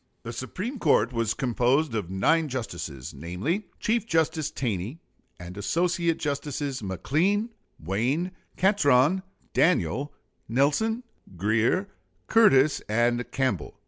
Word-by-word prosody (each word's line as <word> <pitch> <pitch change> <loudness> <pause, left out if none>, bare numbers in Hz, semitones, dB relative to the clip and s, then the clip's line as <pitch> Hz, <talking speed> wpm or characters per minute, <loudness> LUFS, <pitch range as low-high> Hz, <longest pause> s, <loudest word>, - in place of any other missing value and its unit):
The 115 - -6
Supreme 185 - -5
Court 125 - +3
was 115 -2 0
composed 130 +3 +1
of 105 -6 -2
nine 155 - +2
justices; 85 - -5
namely, 95 - -3
Chief 225 +1 0
Justice 160 -5 +1
Taney 115 - -3 0.4
and 90 +1 -8
Associate 170 - 0
Justices 140 -2 -3
McLean, 160 - 0 0.3
Wayne, 120 - -1 0.3
Catron, 180 -4 +4 0.3
Daniel, 150 -5 +2 0.4
Nelson, 150 - +1 0.3
Grier, 115 - +1 0.4
Curtis, 155 -11 +5
and 120 +2 +1
Campbell. 120 - -1
135 Hz, 105 wpm, -26 LUFS, 110-170 Hz, 0.4 s, Curtis